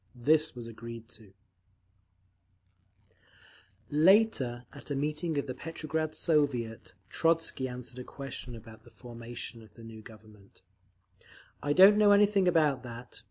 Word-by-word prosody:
This 155 +5 +2
was 120 -1 -7
agreed 115 0 -9
to…. 105 -4 -13 2.6
Later, 150 - +3
at 140 - -10
a 145 - -2
meeting 150 +3 -2
of 140 - -1
the 130 - -5
Petrograd 155 +2 -4
Soviet, 120 - -1
Trotzky 165 -1 0
answered 125 0 -7
a - - -6
question 130 -2 -8
about 110 -1 -13
the - - -17
formation 120 -1 -9
of 110 -2 -18
the 115 - -13
new 115 -1 -10
Government: 110 -2 -17 1.0
"I 145 - 0
don't 195 +5 +8
know 205 -1 +6
anything 200 -2 +4
about 155 -6 +2
that. 120 0 -10
130 Hz, 130 wpm, -30 LUFS, 115-155 Hz, 2.6 s, don't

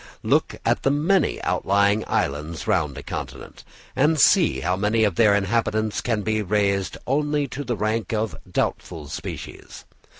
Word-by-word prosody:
Look - - +1
at - - +2
the - - +2
many 155 +5 +1
outlying 100 +2 +2
islands 75 +3 -2
round 70 -3 0
a - - -7
continent, - - -7 0.3
and 155 +3 +2
see 65 - +4
how 90 +6 0
many 105 +3 +1
of 105 -3 +2
their 105 +2 +4
inhabitants 110 +1 0
can 110 -4 -1
be 110 0 0
raised 100 -1 0
only 145 +1 0
to 140 +4 -5
the 120 -4 -3
rank 110 +2 -1
of 110 -1 -1 0.2
doubtful 75 -3 -3
species. - - -8
110 Hz, 155 wpm, -23 LUFS, 100-120 Hz, 0.3 s, see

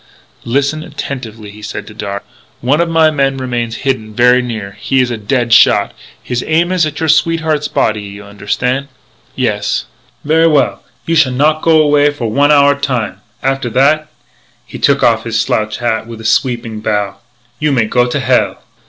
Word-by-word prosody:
"Listen 140 +5 0
attentively," 120 -8 -7
he 105 +1 -13
said 105 0 -6
to 105 - -12
Darragh. 100 -2 -5 0.4
"One 140 +7 +1
of 170 - 0
my 160 -1 +4
men 135 -2 0
remains 120 -3 -3
hidden 110 -6 -2
very 125 +2 +4
near. 110 -5 -5
He 135 +6 0
is 125 -1 +1
a - - -1
dead 120 +2 0
shot. 120 - +5 0.3
His 125 -1 -3
aim 170 +3 +2
is 180 -4 +2
at 150 - -6
your 160 - -1
sweetheart's 160 -1 +1
body. 105 -1 0
You 100 0 -9
understan'?" 125 +7 -2 0.5
"Yes." - - -1 0.4
"Ver' 160 +2 +4
well. 120 -10 +1 0.2
You 165 - -1
shall 135 -6 +3
not 155 +4 +2
go 160 -1 +4
away 145 -1 +4
for 125 -7 -4
one 145 +5 +3
hour 145 -1 +5
time. 125 -8 -3 0.2
After 135 -2 -1
that 145 +6 +2 0.3
" - - -37
he - - -9
took - - +2
off - - +3
his - - -1
slouch 110 0 -1
hat 115 -2 -1
with 115 -1 -9
a 110 - -10
sweeping 115 -2 0
bow 105 -2 -2 0.4
"you 150 -1 +1
may 120 -5 +2
go 125 +3 +1
to 120 - -2
hell!" - - +1
125 Hz, 185 wpm, -14 LUFS, 110-150 Hz, 0.5 s, shot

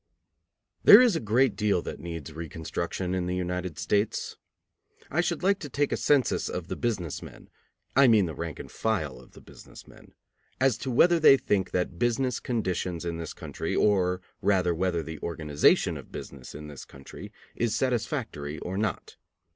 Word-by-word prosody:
There 205 - +11
is 245 -6 +5
a - - 0
great 115 +2 +2
deal 100 -4 +1
that - - -6
needs 80 -2 -7
reconstruction 85 +3 -4
in 90 -1 -1
the 90 - -1
United 90 -2 -3
States. 105 +1 -1 0.8
I 170 - +2
should 175 -1 -2
like 195 +1 +3
to 145 - -7
take 145 +2 0
a - - +1
census 145 -3 +2
of 90 -1 -5
the - - -2
business 95 - -2
men, - - -13 0.4
I 135 0 +7
mean 110 -5 +5
the 80 - -5
rank 80 +2 -5
and - - -9
file 80 - -2
of 65 - -18
the - - -14
business - - -14
men, - - -17 0.5
as 130 -2 +3
to 135 - -4
whether 170 +8 +4
they 145 -3 +7
think 95 -7 0
that 90 -1 -2
business 120 +1 0
conditions 90 -7 -2
in 85 -1 -3
this 85 -1 -6
country, - - -5
or 90 -3 +2 0.2
rather 90 -3 +2
whether 85 -1 -1
the 80 -1 -7
organization 75 -3 +2
of - - -12
business 70 -1 -9
in 75 +1 -8
this 75 -2 -9
country, 65 -1 -11 0.2
is 115 -2 0
satisfactory 80 - -2
or 95 +2 -4
not. 105 -5 -3
95 Hz, 180 wpm, -27 LUFS, 85-120 Hz, 0.8 s, There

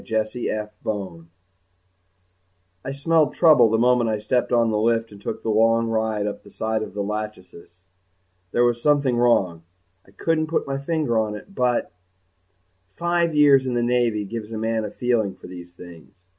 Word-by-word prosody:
F. - - -18
BONE 110 - -2 0.2
Illustrated 110 -3 -3
by - - 0
FINLAY 85 -5 -8 1.6
_I 135 - -4
smelled 155 0 +2
the - - -19
trouble 150 -9 +6
the 110 - +2
moment 120 0 +3
I 110 - 0
stepped 105 +5 -1
on 115 -2 +3
the 105 - 0
lift 115 0 +1
and 100 -1 -13
took - - -5
the 110 - 0
long 115 +1 +3
ride 110 -2 -1
up 105 - -4
the 100 - -16
side 110 +2 -2
of 105 - -7
the 100 - -2
"Lachesis." 95 -4 -7 0.7
There 120 - +2
was 120 -1 0
something 145 -3 +2
wrong. 95 -9 +2 0.4
I - - -23
couldn't 155 +10 -1
put 165 - -1
my 135 0 -3
finger 140 -5 0
on 105 -1 -2
it 195 - -12
but_ 125 -7 0 1.1
five 170 -1 0
years 140 -3 +5
in 125 - -1
the 120 - +1
Navy 120 -3 +1
gives 110 +1 -7
a 110 - -4
man 110 0 -1
a - - -4
feeling 115 -4 -1
for - - -15
these 90 -1 -10
things. 85 -2 -13
115 Hz, 190 wpm, -23 LUFS, 105-125 Hz, 1.6 s, trouble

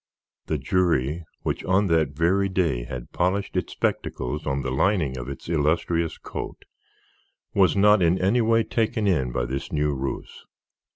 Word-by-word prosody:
The - - 0
jury, 85 -4 +1 0.2
which - - -2
on 95 +2 +3
that 80 -6 +1
very 95 +4 +2
day 85 -11 0
had 60 -1 -7
polished 95 +3 -1
its - - -2
spectacles 75 +5 -2
on 70 0 -1
the 65 - -2
lining 75 -1 +1
of 60 +1 -6
its 70 - -8
illustrious 80 +1 0
coat, - - -7 0.9
was 95 0 +3
not 105 0 +5
in 85 +1 +3
any 105 +7 +3
way 115 0 +3
taken 110 -1 0
in 75 -11 +1
by - - -1
this 65 +3 -4
new 75 -1 +1
ruse. 65 0 -5
85 Hz, 160 wpm, -25 LUFS, 70-95 Hz, 0.9 s, not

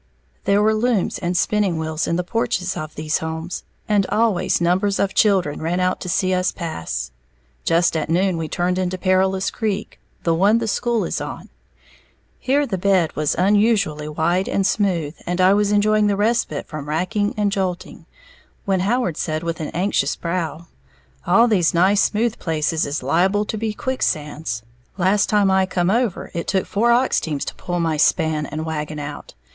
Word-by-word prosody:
There 200 +1 +3
were 220 +1 +3
looms 220 -2 0
and 175 +1 -1
spinning 205 -5 +1
wheels 160 0 -2
in 170 - 0
the 180 - 0
porches 185 -3 -1
of 155 0 -6
these 155 0 -1
homes, 160 +2 -5 0.3
and 205 -2 +2
always 220 -5 +1
numbers 185 +4 +1
of 195 -1 0
children 190 -8 +2
ran 170 +3 -1
out 185 0 0
to 180 - -5
see 185 +2 +1
us 185 0 +1
pass. 80 - -5 0.5
Just 170 0 +2
at 155 -1 -2
noon 185 +2 +2
we 165 -1 -3
turned 180 +3 -1
into 185 0 -1
Perilous 190 +1 +1
Creek, 210 -2 -3 0.2
the 165 - +2
one 200 +7 +4
the 230 -1 -2
school 235 +1 0
is - - -3
on. - - -7 0.9
Here 280 +3 +1
the 190 -8 -3
bed 185 -4 +2
was 150 0 0
unusually 195 -6 +2
wide 170 +5 0
and 195 - 0
smooth, 175 -8 0
and 175 +1 -2
I 185 +1 +5
was 205 0 +2
enjoying 210 0 +3
the 200 -1 +1
respite 210 -8 0
from 150 -2 -7
racking 205 +7 -1
and 205 -1 +1
jolting, 185 -2 -4 0.6
when 195 -2 +1
Howard 205 -3 0
said 155 0 -2
with 165 -1 -3
an 155 - -3
anxious 175 -6 0
brow, 170 -2 -3 0.6
"All 235 +1 +5
these 180 -7 +2
nice 190 +4 +4
smooth 225 +2 0
places 160 -1 -1
is 145 -1 -3
liable 190 +9 +2
to 220 - -4
be 220 0 -2
quicksands, 155 - -2 0.3
last 195 +2 +2
time 205 -2 +3
I 190 0 +3
come 180 0 0
over, 235 -3 -1
it 170 - -4
took 190 -1 0
four 230 +4 +1
ox 250 +2 +3
teams 150 -4 -3
to - - -5
pull 175 -1 -4
my 165 -2 0
span 155 -1 +2
and 155 +2 -5
wagon 155 -1 -4
out. 145 - -7
185 Hz, 180 wpm, -21 LUFS, 160-205 Hz, 0.9 s, I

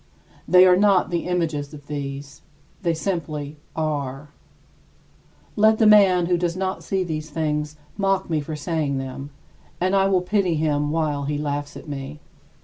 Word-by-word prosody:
They 180 0 +7
are 180 -1 +6
not 195 -2 +3
the 170 0 -1
images 160 -5 -2
of 145 -1 -13
these; 140 -1 -6 0.4
they 170 -3 0
simply 155 -4 -3 0.2
are. 145 -3 -3 1.3
Let 220 +1 +4
the 220 - +3
man 195 -4 +6
who 175 0 +1
does 175 0 -1
not 190 0 -2
see 190 -1 -1
these 155 -2 -4
things 150 -1 -2 0.2
mock 195 -1 +1
me 160 -3 0
for 155 +2 -5
saying 150 -3 -2
them; 135 +1 -6 0.5
and 185 +2 +1
I 195 0 +4
will 185 -2 +2
pity 185 -3 +1
him 150 -1 0
while 150 -3 -1
he 145 +1 -1
laughs 145 -1 -3
at - - -11
me. 140 +1 -6
160 Hz, 160 wpm, -23 LUFS, 145-185 Hz, 1.3 s, They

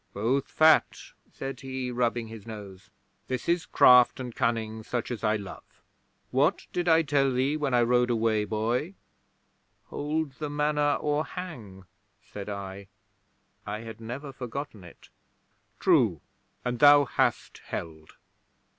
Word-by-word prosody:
'"Both 120 +7 0
fat," 155 0 +4 0.3
said 135 -1 -6
he, 130 -2 -4
rubbing 120 -1 -1
his 110 -1 -11
nose. 100 -4 -10 0.4
"This 130 -2 -4
is 170 +1 +1
craft 125 0 +6
and 125 -2 -6
cunning 110 -1 -1
such 120 +2 -4
as 115 -4 -5
I 105 0 +2
love. 100 -3 -10 0.5
What - - +1
did 175 0 -1
I 165 0 +5
tell 140 -2 +2
thee 130 +4 +1
when 145 -4 0
I 120 - +4
rode 125 +1 +2
away, 110 -2 +1
boy?" 120 - -2 1.0
'"Hold 150 0 -2
the 150 -1 -3
Manor 150 0 +1
or 150 0 0
hang," 120 - -8 0.4
said 100 0 -9
I. 100 -1 -7 0.8
I 105 +1 -4
had 115 0 -9
never 135 +5 -7
forgotten 125 -4 -6
it. 85 - -15 0.7
'"True. - - +3 0.4
And 120 -1 -2
thou 145 0 +7
hast - - -1
held." 80 -1 -7
125 Hz, 135 wpm, -27 LUFS, 110-145 Hz, 1.0 s, thou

